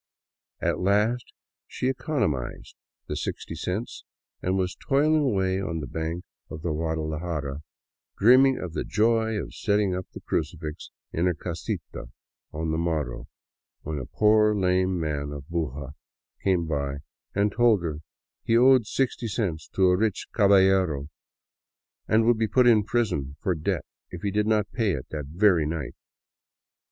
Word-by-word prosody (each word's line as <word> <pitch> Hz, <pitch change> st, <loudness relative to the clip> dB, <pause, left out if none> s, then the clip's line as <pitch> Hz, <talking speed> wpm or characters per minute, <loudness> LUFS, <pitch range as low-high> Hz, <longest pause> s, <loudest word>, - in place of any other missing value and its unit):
At -, -, 0 dB
last 105 Hz, +6 st, +1 dB, 0.4 s
she 125 Hz, -, -3 dB
economized 125 Hz, -, -2 dB, 0.3 s
the -, -, -3 dB
sixty -, -, -4 dB
cents 100 Hz, +6 st, -4 dB, 0.4 s
and 95 Hz, +1 st, 0 dB
was 90 Hz, -1 st, -1 dB
toiling 150 Hz, +3 st, +2 dB
away 95 Hz, -7 st, +1 dB
on 85 Hz, -4 st, -3 dB
the 75 Hz, -, -4 dB
bank 80 Hz, +6 st, -4 dB, 0.3 s
of 75 Hz, +1 st, -8 dB
the 85 Hz, -, -1 dB
Guadalajara, 80 Hz, -2 st, -3 dB, 0.6 s
dreaming 130 Hz, +5 st, +6 dB
of 90 Hz, -3 st, -5 dB
the -, -, -2 dB
joy 110 Hz, 0 st, +2 dB
of -, -, -6 dB
setting 100 Hz, -2 st, +1 dB
up 90 Hz, 0 st, -4 dB
the -, -, -9 dB
crucifix 75 Hz, 0 st, -4 dB, 0.2 s
in 85 Hz, +3 st, +1 dB
her 90 Hz, -, +1 dB
casita 85 Hz, -, -5 dB, 0.5 s
on 80 Hz, +1 st, -2 dB
the 80 Hz, -, 0 dB
morrow, 80 Hz, -7 st, -2 dB, 0.6 s
when 75 Hz, -1 st, -3 dB
a 65 Hz, -, -6 dB
poor 105 Hz, 0 st, +4 dB
lame 95 Hz, -1 st, +1 dB
man 75 Hz, -3 st, -2 dB
of 70 Hz, -1 st, -7 dB
Buga 70 Hz, -5 st, -3 dB, 0.5 s
came 90 Hz, -3 st, +2 dB
by 70 Hz, -3 st, -2 dB, 0.4 s
and 100 Hz, +1 st, +2 dB
told 115 Hz, -4 st, +3 dB
her 75 Hz, -3 st, -3 dB, 0.4 s
he 115 Hz, -, +3 dB
owed 130 Hz, -2 st, +6 dB
sixty 125 Hz, -2 st, -1 dB
cents 95 Hz, -8 st, -2 dB
to 95 Hz, -, +4 dB
a 90 Hz, 0 st, +5 dB
rich 105 Hz, +1 st, 0 dB
caballero, 95 Hz, -7 st, +4 dB, 1.0 s
and 110 Hz, +1 st, +3 dB
would 120 Hz, -1 st, +3 dB
be 110 Hz, -, +2 dB
put 125 Hz, +4 st, +3 dB
in 115 Hz, -3 st, +6 dB
prison 90 Hz, -, -1 dB
for 95 Hz, -, 0 dB
debt 80 Hz, -2 st, -2 dB, 0.2 s
if 90 Hz, -, -9 dB
he 100 Hz, -, 0 dB
did 105 Hz, +1 st, +1 dB
not 105 Hz, -2 st, +1 dB
pay 110 Hz, -5 st, +1 dB
it 65 Hz, -, -4 dB
that 75 Hz, -2 st, -4 dB
very 85 Hz, -1 st, +3 dB
night. 75 Hz, -4 st, -4 dB
95 Hz, 155 wpm, -26 LUFS, 80-110 Hz, 1.0 s, dreaming